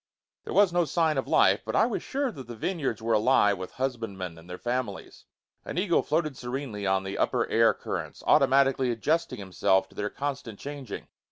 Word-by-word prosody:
There -, -, -5 dB
was 200 Hz, -4 st, +5 dB
no 175 Hz, 0 st, +3 dB
sign 160 Hz, -3 st, +1 dB
of -, -, -4 dB
life, 95 Hz, +2 st, +4 dB
but -, -, -4 dB
I 220 Hz, -, +5 dB
was 235 Hz, -, -2 dB
sure 275 Hz, -1 st, -2 dB
that 135 Hz, -, -10 dB
the 120 Hz, -, -7 dB
vineyards 135 Hz, -, -2 dB
were 115 Hz, 0 st, +1 dB
alive 105 Hz, -3 st, +4 dB
with 95 Hz, -, -7 dB
husband 120 Hz, -6 st, -3 dB
men 90 Hz, -3 st, -5 dB
and 85 Hz, +2 st, -16 dB
their 90 Hz, -, -6 dB
families. 120 Hz, -4 st, -4 dB, 0.4 s
An -, -, -6 dB
eagle 180 Hz, -2 st, +2 dB
floated 155 Hz, -2 st, -1 dB
serenely 120 Hz, -5 st, -4 dB
on 95 Hz, 0 st, +2 dB
the 95 Hz, 0 st, -5 dB
upper -, -, +1 dB
air 115 Hz, -1 st, +5 dB
currents, -, -, -5 dB
automatically 135 Hz, -2 st, +4 dB
adjusting 155 Hz, +8 st, 0 dB
himself 95 Hz, -1 st, +1 dB
to -, -, -20 dB
their 105 Hz, 0 st, -2 dB
constant 140 Hz, -6 st, -5 dB
changing. 140 Hz, -5 st, -7 dB
125 Hz, 195 wpm, -27 LUFS, 105-145 Hz, 0.4 s, was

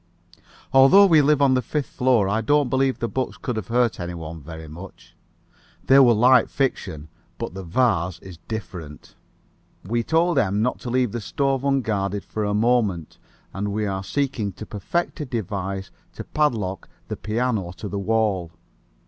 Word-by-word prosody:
Although 135 Hz, +10 st, +8 dB
we 160 Hz, -5 st, +6 dB
live 145 Hz, 0 st, +3 dB
on 135 Hz, -2 st, +4 dB
the 130 Hz, -, +2 dB
fifth 145 Hz, +4 st, -2 dB
floor, 125 Hz, -6 st, +2 dB
I 105 Hz, +3 st, 0 dB
don't 145 Hz, +3 st, +2 dB
believe 135 Hz, 0 st, +1 dB
the 115 Hz, -, -2 dB
books 130 Hz, +2 st, -3 dB
could 125 Hz, -, -4 dB
have 110 Hz, -4 st, -4 dB
hurt 120 Hz, 0 st, +1 dB
anybody 85 Hz, -2 st, -6 dB
very 80 Hz, +1 st, -9 dB
much. 85 Hz, +6 st, -12 dB, 0.7 s
They 135 Hz, +1 st, +6 dB
were 120 Hz, -4 st, +6 dB
light 125 Hz, +4 st, +5 dB
fiction, 80 Hz, -, -2 dB, 0.3 s
but -, -, -5 dB
the 95 Hz, -, -6 dB
vase 90 Hz, -2 st, 0 dB
is 90 Hz, -2 st, -12 dB
different. 90 Hz, -9 st, -7 dB, 0.7 s
We 115 Hz, +5 st, 0 dB
told 165 Hz, +4 st, +2 dB
M. 100 Hz, -4 st, +1 dB
not 125 Hz, -, -1 dB
to 120 Hz, -, -6 dB
leave 125 Hz, -2 st, +1 dB
the 120 Hz, -, -4 dB
stove 135 Hz, +3 st, -1 dB
unguarded 105 Hz, -8 st, 0 dB
for 110 Hz, -, -4 dB
a 105 Hz, 0 st, 0 dB
moment, 105 Hz, -7 st, 0 dB, 0.3 s
and 100 Hz, +2 st, -3 dB
we 105 Hz, +1 st, -1 dB
are 95 Hz, -1 st, -3 dB
seeking 120 Hz, -2 st, -2 dB
to 100 Hz, +4 st, -9 dB
perfect 110 Hz, -, -3 dB
a 150 Hz, -, -3 dB
device 95 Hz, -4 st, -4 dB, 0.2 s
to -, -, -7 dB
padlock 110 Hz, -, -1 dB, 0.2 s
the -, -, -4 dB
piano 110 Hz, -4 st, -2 dB
to 105 Hz, -, -6 dB
the 100 Hz, 0 st, -4 dB
wall. 100 Hz, -4 st, 0 dB
110 Hz, 170 wpm, -23 LUFS, 95-130 Hz, 0.7 s, Although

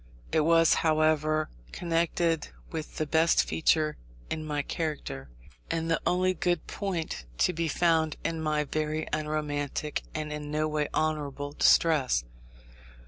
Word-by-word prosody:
It -, -, +3 dB
was, 165 Hz, +1 st, +5 dB
however, 155 Hz, -1 st, +2 dB, 0.2 s
connected 165 Hz, -1 st, 0 dB, 0.2 s
with 160 Hz, -2 st, -6 dB
the 155 Hz, -, 0 dB
best 160 Hz, +2 st, +3 dB
feature 155 Hz, -1 st, +2 dB, 0.3 s
in 155 Hz, -1 st, -2 dB
my 150 Hz, -2 st, -2 dB
character, 140 Hz, -, -4 dB, 0.4 s
and 165 Hz, 0 st, -1 dB
the 165 Hz, -, +1 dB
only 185 Hz, +1 st, +2 dB
good 175 Hz, -3 st, 0 dB
point 170 Hz, -, -3 dB
to 180 Hz, -, +3 dB
be 165 Hz, 0 st, -1 dB
found 160 Hz, -1 st, +2 dB
in 165 Hz, -1 st, -1 dB
my 155 Hz, -1 st, +1 dB
very 155 Hz, +1 st, -2 dB
unromantic 150 Hz, -1 st, -2 dB
and 155 Hz, -1 st, -3 dB
in 150 Hz, -1 st, -5 dB
no 155 Hz, +1 st, 0 dB
way 150 Hz, -1 st, 0 dB
honourable 145 Hz, -2 st, -1 dB
distress. 145 Hz, -, +4 dB
155 Hz, 135 wpm, -28 LUFS, 150-165 Hz, 0.4 s, was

